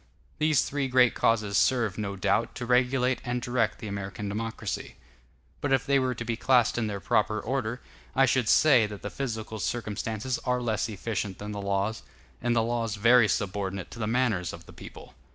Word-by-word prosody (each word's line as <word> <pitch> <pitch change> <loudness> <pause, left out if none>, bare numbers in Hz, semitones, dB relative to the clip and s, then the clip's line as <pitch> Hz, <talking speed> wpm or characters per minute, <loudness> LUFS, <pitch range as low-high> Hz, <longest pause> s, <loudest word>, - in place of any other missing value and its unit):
These 155 -3 +3
three 140 -1 -2
great 125 -1 +4
causes 105 -5 +2
serve, 110 - +2
no 100 -2 -3
doubt, 100 +3 0
to 120 - -4
regulate 125 +1 +2
and 120 0 -2
direct 120 -3 0
the 110 - -7
American 100 0 -5
democracy; 115 +3 -4 0.7
but 145 - -1
if 135 -2 +2
they 140 0 +3
were 130 -1 0
to 120 - -5
be 115 0 -1
classed 120 0 +3
in 110 - 0
their 100 -1 -4
proper 110 -1 +1
order, 125 0 -3 0.3
I 135 - +5
should 125 -3 +1
say 130 -8 +5
that 105 -1 -9
the 105 - -4
physical 110 -5 -4
circumstances 115 +2 -3
are 125 -1 0
less 115 -3 -1
efficient 105 -2 -3
than 105 +1 -6
the 100 -1 -5
laws, 100 +2 -1 0.4
and 120 0 +1
the 115 - +3
laws 115 -2 -1
very 115 +2 +5
subordinate 100 -2 -2
to 120 - -9
the 110 - -1
manners 110 -8 0
of - - -10
the - - -14
people. - - -12
115 Hz, 190 wpm, -27 LUFS, 105-125 Hz, 0.7 s, I